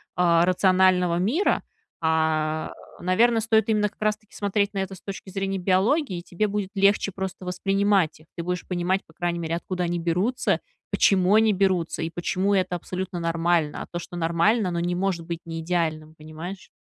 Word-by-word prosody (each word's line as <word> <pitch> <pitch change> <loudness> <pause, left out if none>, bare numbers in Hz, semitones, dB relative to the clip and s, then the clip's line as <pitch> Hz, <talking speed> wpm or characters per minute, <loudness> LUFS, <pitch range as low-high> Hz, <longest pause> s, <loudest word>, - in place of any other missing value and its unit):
рационального 180 +1 +3
мира, 240 - +1 0.4
э, 160 -1 +1 0.3
наверно, 225 +6 +3
стоит 220 0 +2
именно 210 -1 +2
как 210 - -35
раз 215 0 +2
таки 215 -1 -28
смотреть 205 0 0
на - - -5
это 190 0 -3
с - - -16
точки 195 -1 -8
зрения 195 0 -2
биологии, 190 - +1
и - - -8
тебе 210 +5 -1
будет 200 -1 -2
легче 200 0 +3
просто 190 0 -5
воспринимать 195 -1 +1
их, 155 - -22
ты 170 - -3
будешь 180 +1 -3
понимать, 180 +1 0
по 160 - -21
крайней 175 +1 -2
мере, 165 0 -2
откуда 180 +1 -3
они 175 0 -1
берутся, 180 +10 0 0.3
почему 190 +1 +4
они 220 0 +5
берутся, 185 -4 0
и 160 - -2
почему 185 +4 -1
это 185 -2 +1
абсолютно 180 +1 -4
нормально. 165 -2 0
А - - -13
то, 175 - -3
что 175 - -9
нормально, 175 +5 +2
оно 170 - -2
не 175 +1 -1
может 180 -3 -1
быть 170 -1 -4
неидеальным. 165 -1 -2
Понимаешь? 160 +5 -8
180 Hz, 180 wpm, -25 LUFS, 170-195 Hz, 0.4 s, они